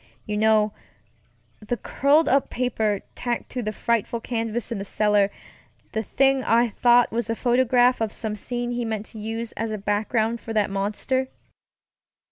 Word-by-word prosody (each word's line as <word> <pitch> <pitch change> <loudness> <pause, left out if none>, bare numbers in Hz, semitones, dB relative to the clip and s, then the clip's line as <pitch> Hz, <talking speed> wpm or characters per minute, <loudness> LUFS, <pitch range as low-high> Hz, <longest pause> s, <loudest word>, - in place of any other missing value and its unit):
You 210 - -3
know, 215 0 +3 0.9
the 225 +3 -3
curled 285 +8 +2
up 275 +1 +2
paper 220 -5 -1
tacked 240 -1 -3
to 250 - -3
that 215 -2 -3
frightful 235 0 0
canvas 230 0 -3
in 225 - -2
the - - -3
cellar; 205 0 +2 0.6
the 220 - -1
thing 270 +4 +2
I 235 +1 +3
thought 240 +2 +4
was 235 0 -2
a 225 - 0
photograph 245 0 +3
of 220 -2 0
some 220 -2 -4
scene 240 +3 -3
he 240 0 -2
meant 220 -2 -3
to 220 - -8
use 225 +2 -4
as 225 0 -3
a 215 - -2
background 220 +3 0
for 225 - -6
that 210 -2 +1
monster. 210 +7 -1
225 Hz, 165 wpm, -24 LUFS, 215-245 Hz, 0.9 s, thought